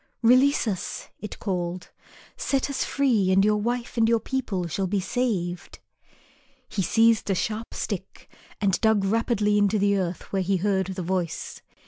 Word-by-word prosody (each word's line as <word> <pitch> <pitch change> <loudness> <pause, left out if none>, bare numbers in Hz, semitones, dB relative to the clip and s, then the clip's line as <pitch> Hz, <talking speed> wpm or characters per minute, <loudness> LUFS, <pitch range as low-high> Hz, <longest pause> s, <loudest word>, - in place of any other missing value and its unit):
"Release 255 +3 +4
us," 190 -4 -4
it 210 - -7
called, 180 -2 -3 0.4
"set 275 0 -1
us 275 - -1
free 240 -9 +1
and 195 +1 +4
your 210 0 +3
wife 240 +3 -3
and 225 0 +4
your 230 -1 +3
people 220 -9 -2
shall 190 +3 -2
be 200 +2 0
saved." 190 -5 -2 0.9
He 200 - -2
seized 225 +3 +3
a 195 - +2
sharp 220 +5 -3
stick - - -5 0.3
and 195 -3 +1
dug 220 -3 +3
rapidly 210 -1 +1
into 205 +1 +2
the 200 0 +2
earth 180 +1 -4
where 195 - +1
he 190 +1 +1
had 180 - -6
heard 190 -2 +1
the 190 -1 -4
voice. 180 -1 -3
205 Hz, 165 wpm, -25 LUFS, 190-230 Hz, 0.9 s, Release